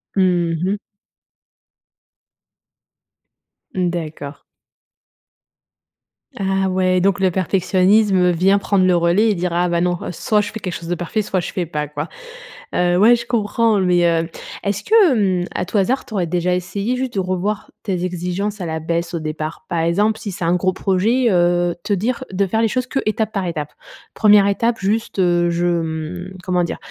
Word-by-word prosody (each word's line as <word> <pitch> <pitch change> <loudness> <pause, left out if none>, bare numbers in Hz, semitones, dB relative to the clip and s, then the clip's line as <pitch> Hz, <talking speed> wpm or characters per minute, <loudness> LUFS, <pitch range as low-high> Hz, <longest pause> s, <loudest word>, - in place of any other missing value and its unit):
Mmh 175 -3 +2
mh. 200 +3 0 3.0
D'accord. 160 -5 -3 2.0
Ah 195 -1 0
ouais, 185 -1 +1
donc 195 +2 +2
le 190 -1 +2
perfectionnisme 190 +1 +2
vient 190 +4 +3
prendre 195 -2 +2
le 180 -1 +4
relais 175 +6 +3
et - - +2
dire: 180 0 -2
«Ah, 175 +1 +2
bah 170 0 0
non, 180 0 +1
soit 210 +5 +1
je 205 0 -5
fais 220 - -6
quelque 180 -3 -4
chose 165 0 -7
de 175 - -1
parfait, 175 +5 -2
soit 190 -1 -1
je 175 - -4
fais 180 -2 -2
pas, 150 -2 -3
quoi», 150 +2 -5 0.7
heu, 175 0 +2
ouais, 225 +5 +6
je 235 - -5
comprends, 230 -2 +1
mais, 180 -2 +3
heu, 165 0 +1 0.3
est-ce 200 0 -2
que, 430 -6 +5 0.3
hem, - - -6
à 180 - -1
tout 210 - -2
hasard, 250 +8 0
tu - - -11
aurais 185 -4 0
déjà 180 +1 0
essayé, 200 +7 -2
juste, 255 -3 -3
de - - +1
revoir 185 +3 -2
tes 185 -4 -2
exigences 185 +3 -3
à 175 - -3
la 160 0 -3
baisse 170 +2 -2
au - - -2
départ? 155 0 -5
Par 170 - -1
exemple, 205 +7 +1
si 205 - -5
c'est 180 - -6
un 170 - +2
gros 185 +1 +1
projet, 215 +7 +1
heu, 175 -1 +2
te 205 - 0
dire 225 +6 -1
de 195 +1 +1
faire 220 +4 0
les 225 - +3
choses 255 +3 -1
que 270 - -1
étape 215 0 -1
par 195 -3 -1
étape? 150 -3 -4 0.4
1re 210 -2 +6
étape 230 +4 +1
juste, 210 +4 -1
heu, 175 -1 +3
je, 170 +1 0
hem, 170 +2 -3
comment 180 -1 +1
dire? 170 - -3
185 Hz, 180 wpm, -19 LUFS, 175-205 Hz, 3.0 s, ouais